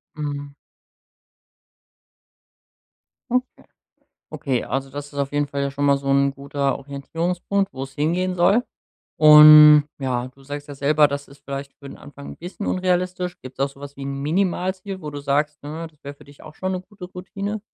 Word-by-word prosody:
Mhm 145 -1 -5 2.8
Okay. 255 +1 -2 0.7
Okay, 130 -4 -2
also 135 +1 -3
das 145 +1 -6
ist 140 - -11
auf 140 0 -1
jeden 145 0 0
Fall 140 0 -3
ja 140 - -2
schon 145 +1 -2
mal 140 0 +4
so'n 140 0 +2
guter 140 0 -2
Orientierungspunkt, 170 +7 -3
wo's 135 0 -7
hingehen 180 +5 0
soll. 195 +7 +3 0.5
Und, 150 -1 +9
ja, 125 -2 -2
du 135 +1 -19
sagst 145 +1 -7
ja 145 - -8
selber, 145 +2 +3
das 140 0 -5
ist 140 - -18
vielleicht 140 0 -6
für'n 140 - -10
Anfang 145 -1 -12
'n - - -19
bisschen 180 +4 -7
unrealistisch. 180 -1 -1
Gibt's 130 +1 -12
auch 140 - +1
so 140 0 -18
was 140 0 -10
wie 140 - -10
'n 140 0 -4
Minimalziel, 185 +3 -2
wo 150 - -5
du 145 - -6
sagst, 150 +2 -1
ne, 160 +3 -6
das 150 -2 -32
wär 140 - -7
für 140 - -19
dich 145 0 -17
auch 155 0 -13
schon 185 0 -3
'ne 185 - -3
gute 195 -1 -12
Routine? 195 +3 -6
145 Hz, 175 wpm, -22 LUFS, 140-180 Hz, 2.8 s, Und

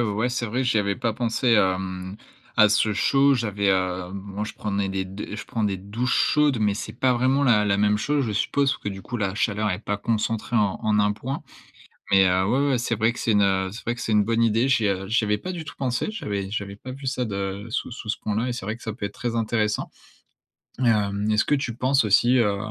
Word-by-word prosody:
ouais, 110 +1 0
c'est 125 -1 -2
vrai 125 +4 -1
j'y 120 -3 +2
avais 100 -1 0
pas 115 - -1
pensé 115 +1 +1
à 95 -2 +3
mmh 95 0 -6 0.4
à 105 - +6
ce 105 +1 +2
chaud, 140 +6 +3
j'avais 105 -5 -1
hem 95 -1 0
moi 100 +1 -5
je 110 - -6
prenais 100 -2 -2
des 95 -1 -2
d 95 +2 -7
je 105 - -6
prends 110 -2 -2
des 100 -2 -1
douches 110 +7 -2
chaudes, 150 -4 +3
mais 105 -1 +2
c'est 110 - -6
pas 125 +1 +1
vraiment 130 +3 +2
la 110 -5 +4
la 100 -1 +1
même 105 0 +3
chose, 140 +4 0
je 110 - -2
suppose 135 +7 +1
parce - - -8
que - - -2
du 95 0 -7
coup 120 +5 -5
la 100 -4 -1
chaleur 105 0 0
est 90 - -2
pas 105 -1 -3
concentrée 115 +2 -1
en 105 -3 +1
en 110 -2 +2
un 105 0 +3
point, 130 +6 -5 0.7
mais 95 0 +6
heu, 90 +1 +2
ouais, 135 +7 +2
ouais, 130 - +2
c'est 115 -1 -1
vrai 110 +2 +1
que - - -9
c'est 115 - +1
une, 105 -1 +4
heu 95 -1 +1
c'est 115 - -9
vrai 120 - 0
que 120 - -8
c'est 110 - -1
une 105 -1 +4
bonne 115 +2 0
idée, 115 +3 +3
j'y 115 -5 +2
a 95 0 -1
j'y 110 +2 +1
avais 105 0 +1
pas 185 - -5
du 175 -3 -5
tout 155 - -10
pensé. 125 -3 -1
J'avais 100 - -4
j'avais 100 -1 -4
pas 130 +4 -8
vu 135 +1 -9
ça 130 -1 -1
de 100 0 -4
sous 115 - -3
sous 115 -2 -8
ce 110 - 0
point 105 - -3
là 115 +4 0
et - - -2
c'est 120 -5 -6
vrai 110 +2 -2
que - - -22
ça 110 - -4
peut 100 - -5
être - - -6
très 120 -2 -3
intéressant, 110 -2 -1 0.9
hem. 105 -3 +1
Est-ce 105 - +2
que 145 - +2
tu 120 -5 -3
penses 130 +2 +2
aussi, 120 +5 +4
heu, 105 -4 +2
110 Hz, 260 wpm, -24 LUFS, 100-120 Hz, 0.9 s, à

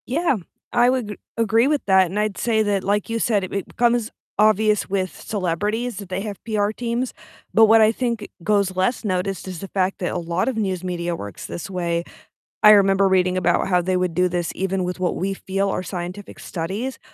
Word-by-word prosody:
Yeah, 285 0 +1 0.4
I 240 +1 +5
would 250 -4 0
g 210 - -6 0.2
agree 230 +2 +3
with 295 -1 +1
that, 190 -1 +5
and 195 +5 -3
I'd 210 -2 -1
say 220 -2 +1
that- 200 -2 0
like 205 +2 0
you 230 0 -1
said- 210 -4 +1
it 185 - -6
it 200 -1 -3
becomes 240 -2 +1 0.3
obvious 215 0 +3
with 190 -1 -1
celebrities 210 +5 -2
that 200 -3 -8
they 185 +1 -2
have 205 -2 -5
PR 210 -2 0
teams, 240 +2 -2 0.4
but 225 0 +7
what 225 +1 +6
I 215 0 +6
think 235 -3 -2 0.2
goes 200 -1 +1
less 190 +8 0
noticed 190 -1 -2
is 185 -3 -6
the 195 - -6
fact 190 0 -1
that 180 - -2
a - - -1
lot 170 +1 -1
of 260 -4 -1
news 190 -4 -1
media 175 -1 -2
works 100 -9 -8
this 175 - -6
way. 170 -2 -1 0.6
I 210 - +9
remember 195 -1 +5
reading 185 -1 +2
about 175 -1 +2
how 180 -1 +3
they 185 +1 0
would 180 -2 0
do 180 +2 +2
this 175 -1 -2
even 190 0 -1
with 180 +1 -3
what 180 -1 0
we 195 +2 -1
feel 195 +1 -2
are 190 - -1
scientific 180 +2 -6
studies 195 +10 -4
195 Hz, 215 wpm, -22 LUFS, 185-220 Hz, 0.6 s, I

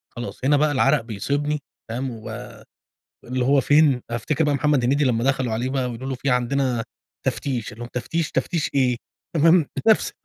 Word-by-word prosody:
خلاص، 120 0 -6
هنا 145 +1 +4
بقى 150 0 +3
العرق 130 - +3
بيصيبني 140 +7 -2 0.3
فاهم؟ 130 +3 -3
واللي 110 -2 -8 0.9
هو 140 0 +4
فين، 145 -2 +4
أفتكر 120 +7 -1
بقى 150 -2 +2
محمد 145 -2 +2
هنيدي 140 +4 +2
لما 120 -2 +1
دخلوا 130 -4 +1
عليه 120 +3 -1
بقى 130 -1 -1
ويقول 125 +3 -6
له: 130 - -2
"في 135 +2 -2
عندنا 125 -1 +1 0.4
تفتيش"، 125 -6 -2
قال 110 - -12
لهم: 120 - -5
"تفتيش؟ 150 +6 -2
تفتيش 170 -4 -1
إيه؟" 125 -3 +3 0.4
تمام؟ 165 +1 +5 0.2
نفس 220 - +4
135 Hz, 170 wpm, -23 LUFS, 120-145 Hz, 0.9 s, تمام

